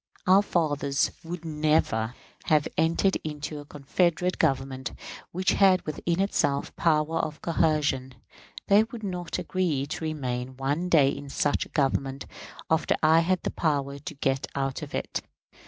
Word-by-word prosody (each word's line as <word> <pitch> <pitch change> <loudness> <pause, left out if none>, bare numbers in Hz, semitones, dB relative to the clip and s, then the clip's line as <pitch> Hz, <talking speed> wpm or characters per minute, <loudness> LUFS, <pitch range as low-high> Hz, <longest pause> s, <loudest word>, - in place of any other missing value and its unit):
Our 190 +1 +6
fathers 145 -7 0
would 170 0 -6
never 150 -7 +1 0.3
have 155 -4 +3
entered 165 +4 +2
into 150 0 -5
a 145 - -10
confederate 170 +5 0
Government 135 -4 0 0.4
which 185 +2 +1
had 190 -2 +4
within 165 +3 -2
itself 170 -8 +1
the - - -14
power 160 0 +2
of 155 -1 -3
coercion; 150 -6 +1 0.5
they 205 +1 +6
would 230 -1 -9
not 180 -3 -3
agree 165 -8 -1
to 150 - -5
remain 130 -5 -3
one 145 +7 -1
day 145 -6 +5
in 140 0 -6
such 145 +1 0
a - - -27
Government 135 -1 0 0.4
after 160 0 +2
I 160 +1 +6
had 180 +2 +1
the - - -1
power 140 -3 -1
to 155 +3 -7
get 135 -1 0
out 135 -1 -2
of - - -6
it. - - -3
155 Hz, 155 wpm, -27 LUFS, 140-170 Hz, 0.5 s, Our